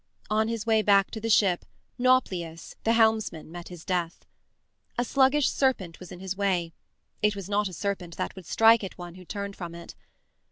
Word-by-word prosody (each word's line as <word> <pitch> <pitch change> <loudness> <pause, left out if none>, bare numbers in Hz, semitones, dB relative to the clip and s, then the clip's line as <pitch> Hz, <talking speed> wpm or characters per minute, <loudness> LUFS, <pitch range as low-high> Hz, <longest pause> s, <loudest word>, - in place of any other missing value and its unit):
On 220 +1 +2
his 230 -1 -3
way 220 -1 +3
back 200 -2 +4
to 220 - -6
the 225 - -2
ship, 195 -5 +3 0.4
Nauplius, 185 -10 +1
the 225 - +4
helmsman, 220 -8 +2
met 175 0 -8
his 175 -3 -11
death. 175 -3 -2 0.7
A 245 - +2
sluggish 270 +3 +3
serpent 205 -11 0
was 180 - -11
in 180 - -9
his 190 0 -4
way 185 -4 0 0.5
it 210 0 +2
was 195 -2 -6
not 205 0 +1
a 185 - -8
serpent 180 -2 -4
that - - -3
would 185 -4 -11
strike 225 0 +5
at 195 - -6
one 175 -1 -8
who 185 0 -13
turned 200 +1 -5
from 170 -2 -7
it. 170 0 -10
200 Hz, 195 wpm, -27 LUFS, 175-220 Hz, 0.7 s, strike